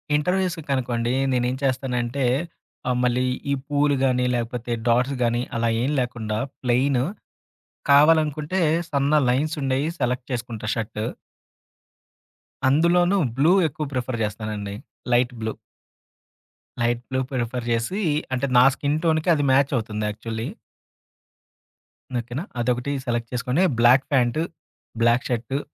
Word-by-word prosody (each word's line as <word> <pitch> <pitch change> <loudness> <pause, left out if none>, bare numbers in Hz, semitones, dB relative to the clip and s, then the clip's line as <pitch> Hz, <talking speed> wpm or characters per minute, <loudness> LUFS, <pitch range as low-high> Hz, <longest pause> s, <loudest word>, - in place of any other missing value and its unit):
ఇంటర్వ్యూస్‌కనుకోండి 145 -9 0 0.2
నేనేం 125 +1 +1
చేస్తానంటే, 130 -1 -1 0.6
ఆహ్, 125 - +1
మళ్ళీ 125 +1 +2 0.3
ఈ - - +3
పూలు 145 -1 +2
గాని, 125 -1 +2
లేకపోతే 120 0 -3 0.2
డాట్స్ 125 +4 +2
గాని, 120 +1 +1 0.2
అలా 115 0 +1
ఏం 140 - 0
లేకుండా 110 -4 -2 0.2
ప్లెయిను 125 +1 +2 0.9
కావాలనుకుంటే 155 +3 +4 0.3
సన్న 140 +1 +1 0.2
లైన్సుండేయి 140 +1 0
సెలెక్ట్ 125 +1 -1
చేసుకుంటా 115 -3 -4
షర్టు. 110 -1 -3 1.6
అందులోనూ 175 +6 +3 0.2
బ్లూ 155 +6 +4 0.2
ఎక్కువ 150 +1 -5
ప్రిఫర్ 125 -1 -2
చేస్తానండి. 105 -1 -4 0.4
Light 120 +1 +3
blue. 110 0 -2 1.3
Light 120 0 +1
blue 130 0 -1
prefer 125 -1 -2
జేసి 120 - -1 0.3
అంటే, 130 +2 0
నా 125 - +8
స్కిన్ 145 +2 -1
టోన్‌కి 160 +1 +2
అది 145 - 0
మాచవుతుంది 115 -6 +1
యాక్చువలీ. 110 +2 -5 1.7
ఓకేనా. 120 +7 -5 0.2
అదొకటి 125 +3 0
సెలెక్ట్ 120 -1 -2
చేసుకొని, 125 +8 +1 0.2
బ్లాక్ 125 +3 +6
ప్యాంటు, 130 +5 +2 0.6
బ్లాక్ 120 +3 +3
షర్టు, 120 +3 -1
125 Hz, 110 wpm, -23 LUFS, 120-145 Hz, 1.7 s, నా